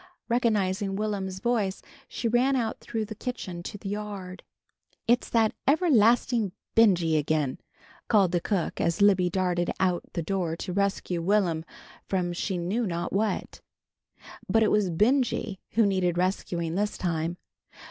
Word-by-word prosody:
Recognizing 205 Hz, -5 st, +1 dB
Will'm's 195 Hz, -3 st, -2 dB
voice 210 Hz, -3 st, -1 dB, 0.2 s
she 235 Hz, -, -3 dB
ran 250 Hz, +4 st, +3 dB
out 230 Hz, -3 st, -1 dB
through 225 Hz, -2 st, -3 dB
the 215 Hz, -, -7 dB
kitchen 210 Hz, -7 st, -5 dB
to 205 Hz, +4 st, -7 dB
the 195 Hz, -, -6 dB
yard. 200 Hz, -3 st, -5 dB, 0.6 s
"It's 240 Hz, +1 st, +2 dB
that 225 Hz, -2 st, +2 dB
everlastin' 240 Hz, -, +3 dB, 0.2 s
Benjy, 175 Hz, -8 st, +4 dB
again!" 150 Hz, -2 st, -1 dB, 0.5 s
called 200 Hz, -5 st, +4 dB
the 175 Hz, -1 st, +1 dB
cook 190 Hz, -4 st, -1 dB
as 170 Hz, +4 st, +1 dB
Libby 190 Hz, -3 st, +4 dB
darted 180 Hz, -1 st, 0 dB
out 180 Hz, -2 st, +2 dB
the 170 Hz, -, -2 dB
door 175 Hz, -2 st, -1 dB
to 180 Hz, +2 st, -5 dB
rescue 195 Hz, -3 st, -1 dB
Will'm 175 Hz, -3 st, +1 dB, 0.4 s
from 180 Hz, -2 st, -1 dB
she 185 Hz, +2 st, -2 dB
knew 200 Hz, +7 st, -1 dB
not 170 Hz, 0 st, -3 dB
what. 210 Hz, +2 st, -1 dB, 0.9 s
But 225 Hz, 0 st, +4 dB
it 215 Hz, -, +2 dB
was 210 Hz, -3 st, +2 dB
Benjy 220 Hz, +1 st, +1 dB
who 225 Hz, 0 st, +4 dB
needed 185 Hz, -3 st, +1 dB
rescuing 175 Hz, -2 st, -1 dB
this 205 Hz, +3 st, -1 dB
time. 170 Hz, -1 st, -2 dB
195 Hz, 145 wpm, -27 LUFS, 175-220 Hz, 0.9 s, Benjy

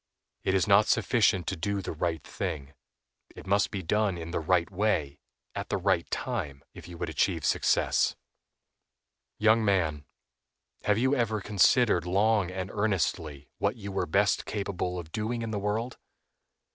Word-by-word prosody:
It 95 Hz, -, +1 dB
is 95 Hz, -, +2 dB
not 100 Hz, +1 st, +5 dB
sufficient 105 Hz, -7 st, +2 dB
to 95 Hz, -, -2 dB
do 100 Hz, +4 st, -2 dB
the 95 Hz, -, -4 dB
right 80 Hz, -1 st, -2 dB
thing, 70 Hz, -2 st, -5 dB, 0.6 s
it -, -, -11 dB
must 100 Hz, +1 st, +2 dB
be 100 Hz, -4 st, -5 dB
done 105 Hz, +2 st, +1 dB
in 85 Hz, 0 st, -6 dB
the -, -, -1 dB
right 85 Hz, +1 st, +2 dB
way, 90 Hz, -8 st, 0 dB, 0.3 s
at -, -, -5 dB
the -, -, 0 dB
right -, -, +1 dB
time, 70 Hz, -1 st, -3 dB
if -, -, -11 dB
you 85 Hz, -1 st, -10 dB
would 85 Hz, -, -3 dB
achieve 80 Hz, -, 0 dB
success. -, -, +2 dB, 1.2 s
Young 110 Hz, +1 st, +4 dB
man, 80 Hz, -8 st, +1 dB, 0.8 s
have 105 Hz, 0 st, +3 dB
you 130 Hz, +4 st, +2 dB
ever 110 Hz, -4 st, 0 dB
considered 100 Hz, -1 st, +3 dB
long 100 Hz, +1 st, +2 dB
and 95 Hz, 0 st, -5 dB
earnestly 80 Hz, -8 st, -1 dB
what -, -, 0 dB
you 100 Hz, -4 st, -7 dB
were 95 Hz, -, -1 dB
best 100 Hz, +5 st, +1 dB
capable 95 Hz, -3 st, -3 dB
of 85 Hz, -2 st, -7 dB
doing 115 Hz, +3 st, -2 dB
in 115 Hz, -, -4 dB
the 105 Hz, -, -2 dB
world? 110 Hz, +5 st, -2 dB
95 Hz, 160 wpm, -28 LUFS, 85-105 Hz, 1.2 s, not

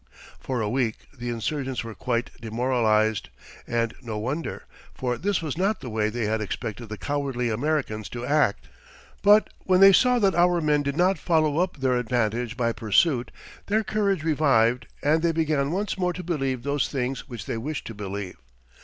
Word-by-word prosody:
For 130 Hz, -3 st, -3 dB
a 105 Hz, -, 0 dB
week 120 Hz, -2 st, -1 dB
the 120 Hz, -2 st, -5 dB
insurgents 130 Hz, +3 st, -2 dB
were 115 Hz, -1 st, -7 dB
quite 120 Hz, +1 st, -2 dB
demoralized, 110 Hz, -2 st, +1 dB, 0.4 s
and 115 Hz, -1 st, 0 dB
no 115 Hz, -4 st, -5 dB
wonder, 135 Hz, +9 st, -3 dB, 0.3 s
for 125 Hz, -1 st, -1 dB
this 195 Hz, +4 st, -1 dB
was 155 Hz, +1 st, -3 dB
not 200 Hz, +3 st, +1 dB
the 125 Hz, -, -6 dB
way 110 Hz, -1 st, +1 dB
they 115 Hz, 0 st, -2 dB
had 110 Hz, +1 st, 0 dB
expected 110 Hz, +2 st, -5 dB
the 105 Hz, -, -5 dB
"cowardly" 135 Hz, -4 st, -2 dB
Americans 120 Hz, -4 st, -1 dB
to 120 Hz, 0 st, -5 dB
act. 150 Hz, +3 st, +1 dB, 0.5 s
But 210 Hz, +1 st, +5 dB
when 185 Hz, -1 st, +4 dB
they 195 Hz, 0 st, +9 dB
saw 250 Hz, +6 st, +5 dB
that 200 Hz, -5 st, +3 dB
our 175 Hz, 0 st, +3 dB
men 150 Hz, -2 st, +2 dB
did 140 Hz, +1 st, -3 dB
not 185 Hz, +2 st, +3 dB
follow 155 Hz, -2 st, +2 dB
up 180 Hz, -2 st, 0 dB
their 130 Hz, -2 st, +1 dB
advantage 120 Hz, 0 st, -1 dB
by 115 Hz, -1 st, +1 dB
pursuit, 120 Hz, -, +2 dB, 0.4 s
their 220 Hz, +2 st, +2 dB
courage 200 Hz, -6 st, 0 dB
revived 135 Hz, -7 st, +2 dB, 0.2 s
and 155 Hz, +2 st, +3 dB
they 170 Hz, 0 st, +2 dB
began 155 Hz, -3 st, +1 dB
once 195 Hz, +3 st, -2 dB
more 180 Hz, -1 st, +1 dB
to 180 Hz, -, -6 dB
believe 135 Hz, -7 st, -2 dB
those 140 Hz, 0 st, 0 dB
things 135 Hz, 0 st, -3 dB
which 115 Hz, -5 st, -7 dB
they -, -, -3 dB
wished 150 Hz, +6 st, -4 dB
to 115 Hz, -, -6 dB
believe. 100 Hz, -2 st, -6 dB
130 Hz, 180 wpm, -25 LUFS, 115-160 Hz, 0.5 s, they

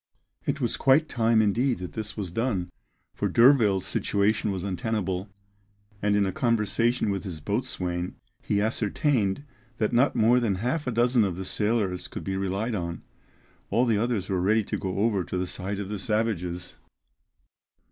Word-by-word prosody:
It -, -, 0 dB
was -, -, -1 dB
quite 140 Hz, +4 st, +4 dB
time 115 Hz, -4 st, +3 dB
indeed 120 Hz, +4 st, +1 dB
that 90 Hz, 0 st, -7 dB
this 110 Hz, -1 st, -5 dB
was 95 Hz, -5 st, -4 dB
done, 100 Hz, -5 st, -1 dB, 0.4 s
for -, -, -1 dB
D'Urville's 115 Hz, -7 st, +5 dB
situation 105 Hz, +1 st, +1 dB
was 95 Hz, -2 st, -3 dB
untenable, 100 Hz, -1 st, -2 dB, 0.7 s
and 105 Hz, 0 st, +2 dB
in 100 Hz, -1 st, +3 dB
a 95 Hz, -, -1 dB
conversation 115 Hz, 0 st, +1 dB
with 100 Hz, -1 st, -3 dB
his 90 Hz, -6 st, -6 dB
boatswain 90 Hz, -2 st, -3 dB, 0.3 s
he 100 Hz, -, 0 dB
ascertained 110 Hz, +1 st, 0 dB, 0.3 s
that 110 Hz, 0 st, 0 dB
not 125 Hz, +4 st, +3 dB
more 120 Hz, +2 st, +4 dB
than 110 Hz, -5 st, 0 dB
half 125 Hz, -, -2 dB
a -, -, +1 dB
dozen 120 Hz, 0 st, +3 dB
of 95 Hz, -4 st, -1 dB
the 95 Hz, -, -5 dB
sailors 105 Hz, -3 st, 0 dB
could -, -, -7 dB
be 95 Hz, -, -2 dB
relied 100 Hz, +5 st, -1 dB
on; 85 Hz, -4 st, -4 dB, 0.7 s
all 125 Hz, -, +3 dB
the 110 Hz, -4 st, +2 dB
others 115 Hz, -4 st, -1 dB
were 95 Hz, -2 st, 0 dB
ready 110 Hz, +4 st, +3 dB
to -, -, -3 dB
go 95 Hz, -2 st, -3 dB
over 100 Hz, -2 st, +1 dB
to 90 Hz, -, -4 dB
the 90 Hz, -, 0 dB
side 95 Hz, +2 st, -4 dB
of 100 Hz, -1 st, -5 dB
the 105 Hz, -1 st, -4 dB
savages. 95 Hz, -6 st, -2 dB
105 Hz, 170 wpm, -26 LUFS, 95-115 Hz, 0.7 s, D'Urville's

